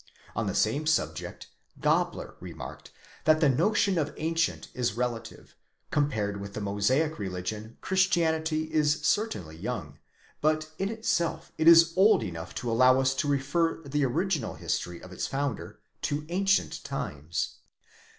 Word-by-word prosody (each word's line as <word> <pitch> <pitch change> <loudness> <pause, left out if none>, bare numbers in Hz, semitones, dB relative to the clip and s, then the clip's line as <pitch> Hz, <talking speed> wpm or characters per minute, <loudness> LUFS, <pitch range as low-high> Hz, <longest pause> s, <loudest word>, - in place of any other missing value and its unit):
On 115 -1 -1
the 95 - -2
same 140 +8 +1
subject, 160 - -1 0.3
"Gabler® - - 0
remarked - - -9 0.4
that 155 0 +5
the 155 -3 +4
notion 195 - +2
of 150 -1 -1
ancient 165 +1 -1
is 120 -6 -1
relative; 115 -2 -4 0.4
compared 110 -9 0
with 100 0 -8
the - - -3
Mosaic 110 +10 +1
religion 105 +4 -5
Christianity 160 -4 +1
is 150 -1 +2
certainly 205 - 0
young; 85 - -5 0.4
but 155 +1 +1
in 195 +1 0
itself 220 -7 -1
it 160 - +2
is 165 0 +8
old 195 - +5
enough 85 -3 -6
'to 120 - -2
allow 130 +3 +5
us 135 0 +2
to 140 +2 -1
refer 145 +4 +1
the 145 0 -1
original 165 +6 0
history 85 -1 -3
of 90 - -11
its 95 - -3
founder 140 -2 -3 0.2
to 145 +1 -2
ancient 195 +3 +1
times. 85 - -4
145 Hz, 140 wpm, -28 LUFS, 110-160 Hz, 0.4 s, is